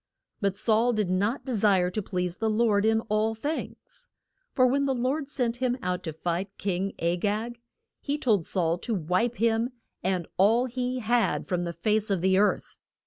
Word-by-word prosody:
But 200 -2 0
Saul 230 +2 +3
did 210 -5 0
not 210 +8 0
de 260 - -3
sire 195 -4 +3
to 215 - -2
please 180 -2 -3
the 220 0 0
Lord 215 -2 +2
in 220 0 +3
all 220 0 0
things. 310 - -6 0.4
For 255 - +3
when 275 +3 +2
the 265 - +1
Lord 270 +4 -1
sent 245 -5 -1
him 250 0 0
out 180 0 -1
to 160 - -3
fight 170 +4 -3
King 195 0 -2
A 170 +1 0
gag, 220 +5 -2 0.4
he 285 0 -2
told 215 - +1
Saul 170 -2 0
to 230 +2 -2
wipe 185 +7 0
him 230 +1 +1 0.3
and 185 -2 -1
all 225 +6 +4
he 250 0 -3
had 235 +1 +1
from 175 -2 -1
the 170 - -3
face 215 +5 0
of 195 -4 0
the 190 +1 +3
earth. 210 - 0
215 Hz, 190 wpm, -27 LUFS, 185-240 Hz, 0.4 s, all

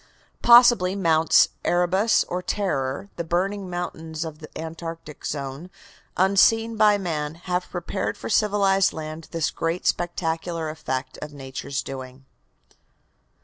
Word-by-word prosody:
Possibly 235 -6 +6
Mounts 165 -4 +4
Erebus 185 +5 +2
or 180 +1 -4
Terror, 180 -4 -2
the - - -2
burning 185 +3 -1
mountains 165 -2 -5
of 155 -1 -8
the 155 - -10
Antarctic 165 -1 -7
zone, 140 +4 -5 0.5
may, 185 - +5
unseen 225 +4 +3
by 210 -1 +5
man, 155 -5 -3
have 180 +1 -3
prepared 180 +2 -3
for - - -7
civilized 200 -3 +3
lands 155 0 -7
this 165 -3 -1
grand 165 +2 -3
spectacular 165 -1 -1
effect 130 -4 -5
of 150 -1 -8
Nature's 135 0 -5
doings. 130 0 -8
170 Hz, 125 wpm, -24 LUFS, 155-195 Hz, 0.5 s, Possibly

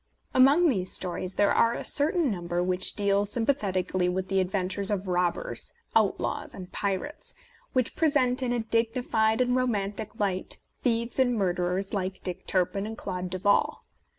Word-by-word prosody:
Among 280 +7 +6
these 190 - 0
stories 185 +1 -3
there 205 - +3
are 230 0 +3
a - - -5
certain 305 -1 +2
number 175 -2 -2
which 180 0 0
deal 200 -1 +2
sympathetically 195 -6 0
with 185 +1 -2
the 195 0 +2
adventures 190 +1 0
of 200 -2 -1
robbers, 180 -1 -1 0.2
outlaws 215 -3 0
and 185 -2 -9
pirates, 200 +9 -3 0.4
which 255 -2 0
present 285 -5 +2
in 250 -2 -1
a 240 -1 0
dignified 225 0 +1
and 250 0 +2
ro 255 0 +2
mantic 210 0 -3
light 190 -3 -1 0.2
thieves 235 0 +1
and 245 -2 +3
murderers 180 0 -1
like 190 -1 -3
Dick 180 0 -5
Turpin 195 +2 0
and 220 0 -7
Claude 180 -2 -4
Duval. 185 +2 +1
200 Hz, 155 wpm, -27 LUFS, 185-240 Hz, 0.4 s, Among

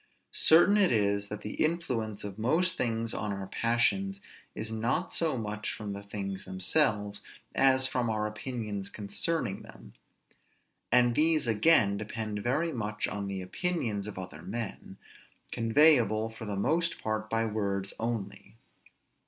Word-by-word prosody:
Certain 175 +6 +5
it 195 -3 +4
is, 100 -2 +1
that 105 +1 -6
the 105 - -1
influence 125 -10 -2
of 100 0 -7
most 165 +11 +2
things 115 -1 -1
on 105 -1 -3
our 100 -1 -4
passions 120 - +1 0.4
is 110 +1 -3
not 115 +10 -1
so 160 -5 0
much 105 -1 -3
from 105 -2 -5
the 100 - -6
things 100 -1 -5
themselves, 105 +2 +1 0.3
as 130 -1 +4
from 125 -2 0
our 110 -1 -1
opinions 105 -3 -4
concerning 105 +3 -2
them; - - -13 1.0
and 120 0 +5
these 155 +1 +3
again 110 -2 +4
depend 105 0 -4
very 155 +9 0
much 105 -3 -2
on 100 0 -4
the 95 -1 -4
opinions 110 - -1
of 105 - -7
other 85 -5 -7
men, 110 -3 -6 0.5
conveyable 115 -3 +4
for 110 0 -9
the 105 -1 -3
most 165 - +1
part 110 0 -2
by 115 0 +1
words 100 -3 -2
only. 110 -3 -4
110 Hz, 145 wpm, -29 LUFS, 100-130 Hz, 1.0 s, Certain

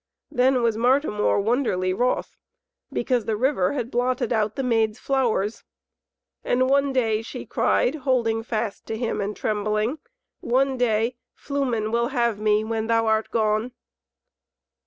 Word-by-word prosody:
Then 255 -2 +2
was 230 -2 +1
Martimor 245 -4 +2
wonderly 200 -5 0
wroth, 250 +5 -1 0.6
because 240 -2 0
the 220 - 0
river 255 -6 +1
had 250 -3 -3
blotted 245 0 0
out 215 -1 0
the 270 - -2
Maid's 225 -3 +1
flowers. 235 -6 0 0.8
"And 255 +1 +2
one 280 +1 +2
day," 225 -5 +1
she 225 - -8
cried, 250 - +1
holding 245 -5 +1
fast 225 -2 -4
to 220 - -3
him 230 -2 -2
and 200 +1 -3
trembling, 215 +5 -1 0.4
"one 265 +2 +1
day 235 -1 +1 0.2
Flumen 250 -7 -2
will 235 +1 +1
have 235 -5 0
me, 215 0 +2
when 220 0 -2
thou 230 0 +2
art 220 0 +1
gone." 220 +2 0
230 Hz, 140 wpm, -24 LUFS, 215-255 Hz, 0.8 s, Then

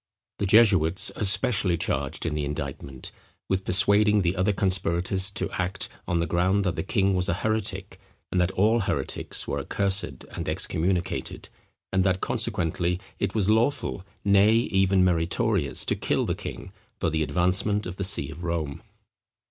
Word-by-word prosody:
The 100 - 0
jesuits 95 -3 +4
are - - -5
specially 100 -3 +2
charged - - -2
in 80 - -1
the 75 -1 -2
indictment 70 -2 -6 0.4
with 95 0 -1
persuading 105 +2 +4
the 90 +1 0
other 95 +3 +1
conspirators 95 0 0
to 100 - -3
act, 95 +1 -2 0.2
on 85 -1 0
the 85 - 0
ground 90 +4 +1
that 95 - -1
the - - -2
king 95 -1 +1
was 90 -1 +1
a 85 - +1
heretic, 100 -2 -3 0.3
and 90 - +1
that 90 - +1
all 110 +5 +3
heretics 100 - -2
were - - -2
accursed 100 0 +1 0.3
and - - -5
excommunicated; 90 +1 -2 0.4
and 95 0 +3
that, 95 -1 +1
consequently, 85 +1 0 0.2
it 100 0 -2
was 100 -4 +1
lawful, 110 -2 0 0.2
nay 100 +2 +5
even 95 -4 +2
meritorious, 85 - 0
to - - 0
kill - - -1
the - - -1
king, - - -8 0.3
for 85 - 0
the 80 0 -1
advancement 90 +6 +1
of 90 +1 -7
the 100 - -3
see 95 - +2
of 85 - -10
Rome. 80 -4 -3
95 Hz, 165 wpm, -25 LUFS, 85-100 Hz, 0.4 s, nay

